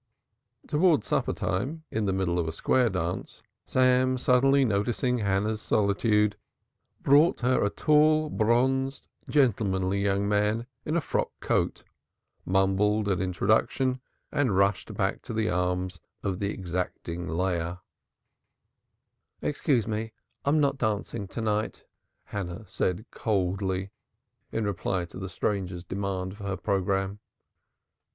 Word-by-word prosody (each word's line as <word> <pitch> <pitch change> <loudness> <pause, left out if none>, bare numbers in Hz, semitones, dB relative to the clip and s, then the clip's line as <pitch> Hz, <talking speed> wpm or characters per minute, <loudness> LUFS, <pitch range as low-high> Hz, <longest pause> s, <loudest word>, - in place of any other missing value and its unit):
Towards 155 - +3
supper - - 0
time, 135 - -2
in 110 -1 -1
the 95 - +1
middle 95 -2 0
of 85 - -1
a - - -1
square 125 +8 +2
dance, 90 -2 -4 0.2
Sam 130 0 +3
suddenly 135 +2 +4
noticing 120 +4 0
Hannah's 105 +1 0
solitude, 105 0 +2 0.7
brought 145 +3 +5
her 125 +1 +2
a 100 - +2
tall 155 +3 +3
bronzed 130 +4 +1 0.2
gentlemanly 100 -8 +2
young 100 0 +1
man 105 +3 +1 0.2
in 155 - -1
a 170 - +2
frock - - -1
coat, - - 0 0.6
mumbled 95 +3 +2
an 95 -2 +1
introduction 110 +7 +1 0.3
and 135 -10 +1
rushed 100 -1 +2
back - - 0
to - - -7
the 110 -1 +1
arms 90 0 -1 0.2
of 95 -1 -2
the 100 -1 -1
exacting 90 -1 -4
Leah. 85 0 -1 1.6
"Excuse 140 -6 0
me, 110 0 -3 0.3
I - - +1
am 155 +2 +4
not 140 -2 +1
dancing 105 -3 -2
to 115 - -5
night," 110 0 -1 0.4
Hannah 95 +1 -5
said 95 +2 -1
coldly 95 -2 -1 0.6
in 115 - -1
reply 95 -2 -1
to 85 - -10
the 95 -1 -5
stranger's 90 -1 -2
demand 95 0 -3
for 100 - -8
her 100 -1 -2
programme. 95 0 -1
105 Hz, 130 wpm, -27 LUFS, 95-125 Hz, 1.6 s, brought